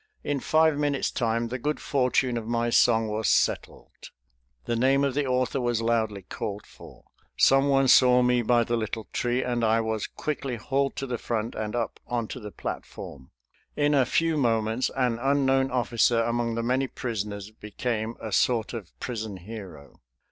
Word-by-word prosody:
In 145 -1 -1
five 155 +1 +3
minutes' 145 -2 0
time 115 -1 -1
the 130 +2 -4
good 150 +4 -2
fortune 130 -2 +1
of 115 -2 -4
my 120 0 0
song 115 -1 +4
was 105 +1 -1
settled. - - -1 0.6
The 120 - -1
name 135 +4 +3
of 140 -2 +1
the 145 0 0
author 130 +1 0
was 120 -2 0
loudly 110 -3 0
called 100 +2 -5
for; - - -15 0.3
someone 135 0 +4
saw 125 -1 +6
me 125 0 +3
by 120 +1 +3
the 120 +1 -1
little 110 -1 -4
tree, 125 +1 0
and 120 -1 -1
I 110 0 +3
was 110 -2 -2
quickly 140 -4 -4
hauled 135 +4 -1
to 135 - -3
the 125 -3 -4
front 115 -1 -2
and 110 +1 -4
up 115 -2 -3
onto 120 0 -3
the 105 -3 -7
platform. 65 - -7 0.5
In 145 0 +2
a 135 -3 +3
few 165 -1 +1
moments 115 -2 +1
an 125 -3 +1
unknown 135 0 +2
officer 120 -2 +2
among 115 0 -1
the 115 - -2
many 130 +3 +1
prisoners 105 -5 -5
became 110 +1 -4
a 110 - -6
sort 115 +3 +1
of 105 -8 -8
prison 110 -5 -5
hero. 95 - -10
120 Hz, 170 wpm, -26 LUFS, 110-130 Hz, 0.6 s, saw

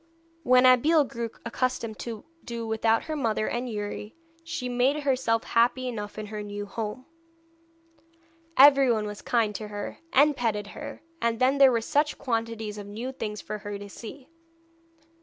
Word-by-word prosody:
When 255 -3 +5
Abeille 290 +5 +6
grew 235 -3 -4 0.2
accustomed 235 -2 -2
to 225 -3 -6 0.2
do 235 -1 -5
without 225 0 +1
her 315 - -4
mother 225 -6 0
and 245 +1 -2
Youri, 210 +1 -5 0.3
she 275 -6 -4
made 255 +4 +1
herself 255 -5 +1
happy 245 +2 +2
enough 210 -4 -5
in 215 - -4
her 210 0 -6
new 205 0 -5
home. 220 +4 -5 1.5
Everyone 270 -6 +6
was 210 0 -6
kind 230 -4 +1
to 215 +1 -5
her, 205 0 -6
and 290 +2 +5
petted 220 -5 -1
her, - - -8 0.2
and 230 -1 +1
then 265 +2 +3
there 270 -2 +8
were 230 -2 +1
such 290 +6 +1
quantities 225 -4 -3
of 205 - -8
new 230 +6 -5
things 210 -5 -5
for 215 - -5
her 205 -1 -5
to 205 0 -9
see. 255 +6 -10
230 Hz, 160 wpm, -27 LUFS, 210-255 Hz, 1.5 s, there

